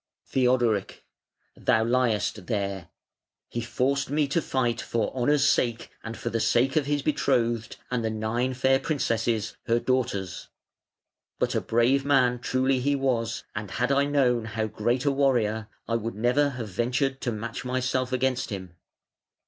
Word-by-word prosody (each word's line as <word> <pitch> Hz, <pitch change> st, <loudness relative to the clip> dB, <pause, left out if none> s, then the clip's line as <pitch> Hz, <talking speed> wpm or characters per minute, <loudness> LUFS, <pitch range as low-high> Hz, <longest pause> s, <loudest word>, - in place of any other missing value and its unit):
Theodoric: 125 Hz, -5 st, +1 dB, 0.5 s
"Thou 110 Hz, -, +2 dB
liest 110 Hz, -5 st, 0 dB
there. 100 Hz, -4 st, -2 dB, 0.6 s
He 120 Hz, -, -3 dB
forced 130 Hz, +4 st, 0 dB
me, 145 Hz, 0 st, +1 dB
to 165 Hz, +4 st, +1 dB
fight 125 Hz, -5 st, 0 dB
for 115 Hz, -3 st, -2 dB
honour's 140 Hz, +3 st, +3 dB
sake 120 Hz, -5 st, +1 dB
and 110 Hz, 0 st, -6 dB
for 120 Hz, -, -4 dB
the 115 Hz, -, 0 dB
sake 125 Hz, +4 st, +2 dB
of 150 Hz, -3 st, +2 dB
his 145 Hz, -1 st, 0 dB
betrothed 120 Hz, -6 st, 0 dB, 0.2 s
and 120 Hz, -2 st, 0 dB
the 110 Hz, -, 0 dB
nine 115 Hz, +4 st, -1 dB
fair 135 Hz, +1 st, +3 dB
princesses, 115 Hz, -6 st, -1 dB
her 115 Hz, 0 st, +3 dB
daughters. 115 Hz, -8 st, -1 dB, 0.9 s
But -, -, 0 dB
a -, -, +1 dB
brave 120 Hz, +4 st, +2 dB
man 130 Hz, -3 st, +3 dB
truly 130 Hz, +1 st, +1 dB
he 140 Hz, +3 st, +1 dB
was, 120 Hz, -4 st, -1 dB
and 105 Hz, -1 st, -4 dB
had 125 Hz, +6 st, -1 dB
I 140 Hz, 0 st, +3 dB
known 125 Hz, -5 st, +2 dB
how 110 Hz, 0 st, -2 dB
great 120 Hz, +5 st, -1 dB
a 140 Hz, -, +4 dB
warrior 120 Hz, -6 st, +1 dB, 0.2 s
I 115 Hz, -, +1 dB
would 115 Hz, -1 st, -4 dB
never 125 Hz, +7 st, +2 dB
have 115 Hz, -4 st, -5 dB
ventured 130 Hz, +7 st, -1 dB
to 120 Hz, -, -1 dB
match 115 Hz, +1 st, -5 dB
myself 130 Hz, 0 st, -1 dB
against 130 Hz, -1 st, 0 dB
him". 95 Hz, -4 st, -7 dB
120 Hz, 155 wpm, -26 LUFS, 110-130 Hz, 0.9 s, a